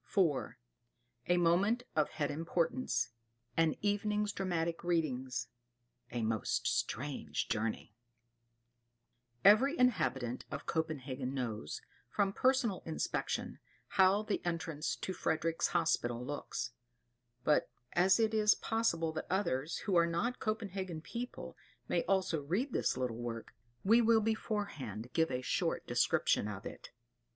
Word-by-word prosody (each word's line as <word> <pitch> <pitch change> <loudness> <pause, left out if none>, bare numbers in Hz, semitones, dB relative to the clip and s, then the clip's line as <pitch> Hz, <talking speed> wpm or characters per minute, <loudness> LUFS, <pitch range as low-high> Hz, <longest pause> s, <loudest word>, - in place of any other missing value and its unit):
IV. 165 -9 +1 0.7
A 175 - +4
Moment 190 +8 +3
of 155 - +3
Head 145 -2 -2
Importance 165 - 0 0.5
An 165 -1 +3
Evening's 210 0 +1
"Dramatic 170 -4 -1
Readings" 135 -7 -1 0.6
A 120 -1 -2
Most 110 -1 0
Strange 140 +1 -1
Journey 110 -1 -2 1.5
Every 255 +10 +7
inhabitant 145 - +1
of 140 - -5
Copenhagen 140 -5 -2
knows, 110 - -3 0.3
from 195 +5 +1
personal 255 -6 +2
inspection, 160 - -2 0.3
how 190 +2 +4
the 215 -1 -2
entrance 165 -3 -2
to 190 - -4
Frederick's 165 -1 0
Hospital 125 -8 0
looks; 125 -4 -4 0.7
but 150 - +3 0.2
as 190 +4 +5
it 220 -1 +2
is 210 -1 +5
possible 170 -8 0
that 160 - -5
others, 170 -6 0
who 195 - +1
are 170 -1 +5
not 205 +10 -1
Copenhagen 195 -6 -3
people, 240 +8 -6 0.3
may 170 - +2
also 185 -5 +1
read 200 - -1
this - - +1
little 125 -3 -2
work, 115 -1 -5 0.3
we 225 +5 +6
will 230 -1 +5
beforehand 200 - -2
give 165 0 +3
a 125 0 -2
short - - 0
description - - +2
of 105 +1 -6
it. - - -8
170 Hz, 125 wpm, -34 LUFS, 135-205 Hz, 1.5 s, Every